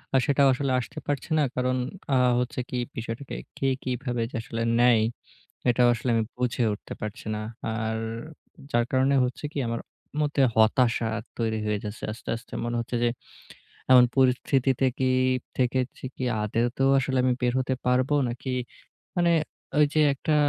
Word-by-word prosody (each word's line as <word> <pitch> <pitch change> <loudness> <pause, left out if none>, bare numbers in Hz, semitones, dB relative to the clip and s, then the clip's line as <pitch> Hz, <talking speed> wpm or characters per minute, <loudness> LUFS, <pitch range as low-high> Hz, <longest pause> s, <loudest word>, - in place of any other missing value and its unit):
আ - - +7
সেটাও 140 -1 +4
আসলে 135 +1 -1
আসতে 120 - -6
পারছে 145 +2 -2
না। 150 - +4
কারণ 125 0 +1 0.4
আ - - +5 0.2
হচ্ছে 125 +1 -2
কি 125 - -3 0.2
বিষয়টাকে 115 +4 -5 0.2
কে 135 - 0 0.2
কিভাবে 125 -1 -2
যে - - -7
আসলে 115 0 -5 0.2
নেয়, 120 -2 +5 0.7
এটাও 120 0 +4
আসলে 120 +2 -3
আমি 115 - +2
বুঝে 125 -1 0
উঠতে 105 - -8
পারছি 105 +2 -6
না। - - -3 0.3
আর 110 0 -2 0.7
যার 120 0 +2
কারণে 135 +1 +3
হচ্ছে 125 +4 -5
কি - - -2
আমার 115 0 -2 0.4
মধ্যে 145 -1 +1
হতাশা 115 +1 +3 0.3
তৈরি 110 -1 0
হয়ে 105 -1 0
যাচ্ছে 105 0 -7
আস্তে, 115 - -9
আস্তে। 115 +2 -11
মনে 120 0 -2
হচ্ছে 120 +1 -3
যে 120 - +4 0.8
এমন 125 -1 +9
পরিস্থিতিতে 130 0 +2
কি 130 - +1 0.5
থেকেছি 130 0 -1
কি 130 - -3 0.2
আদতেও 120 +5 +1
আসলে 130 0 0
আমি 130 - +3
বের 125 -1 +2
হতে 130 0 0
পারবো? 125 +3 +2
নাকি 120 +3 -6 0.7
মানে 175 -1 +3 0.5
ওইযে 150 +1 +4
একটা 155 +3 0
125 Hz, 160 wpm, -26 LUFS, 115-135 Hz, 0.8 s, এমন